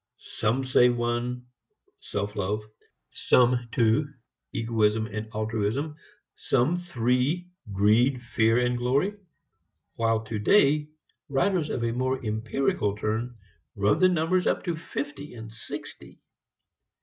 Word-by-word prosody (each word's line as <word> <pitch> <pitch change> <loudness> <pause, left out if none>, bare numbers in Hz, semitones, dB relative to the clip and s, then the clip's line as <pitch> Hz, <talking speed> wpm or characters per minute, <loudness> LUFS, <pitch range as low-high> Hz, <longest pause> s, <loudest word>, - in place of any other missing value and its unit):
Some 120 +5 -1
say 130 -1 +5
one, 120 +1 -2 0.5
self 100 0 -4
love; 105 +2 -2 0.5
some 125 -1 +2
two, 115 +6 +2 0.4
egoism 110 -1 +1
and 110 0 -6
altruism; 110 +7 -2 0.4
some 135 +6 +1
three, 150 +1 0 0.2
greed, 110 +7 +3
fear 115 -1 +2
and 125 0 +1
glory; 140 +11 +1 0.8
while 115 -1 +1
today 140 - +3 0.4
writers 160 +4 +1
of 120 - -2
a 115 - 0
more 130 +2 -1
empirical 110 -1 0
turn 115 +3 -2 0.4
run 100 +1 +2
the 185 - +6
number 175 +1 +2
up - - -1
to 175 -3 -2
fifty 145 -3 -6
and 110 -1 -9
sixty. 115 - -7
120 Hz, 115 wpm, -26 LUFS, 110-140 Hz, 0.8 s, the